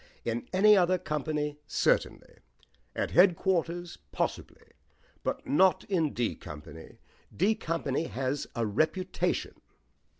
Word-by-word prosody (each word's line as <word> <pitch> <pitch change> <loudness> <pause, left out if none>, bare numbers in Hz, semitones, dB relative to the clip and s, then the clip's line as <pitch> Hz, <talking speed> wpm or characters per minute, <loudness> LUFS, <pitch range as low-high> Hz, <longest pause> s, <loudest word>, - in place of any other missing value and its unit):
In 115 0 -2
any 210 +3 +6
other 185 -1 +3
company, 150 -2 -3
certainly; - - 0 0.6
at - - -2
headquarters, 175 -1 +2
possibly; - - -4 0.5
but - - -3
not 185 +4 +4
in 165 -7 0
D 120 -2 -1
Company. 75 +1 -11 0.4
D 200 +5 +3
Company 165 -7 -2
has 135 0 -3
a 115 -2 0
reputation." 160 - -1
165 Hz, 105 wpm, -29 LUFS, 135-185 Hz, 0.6 s, any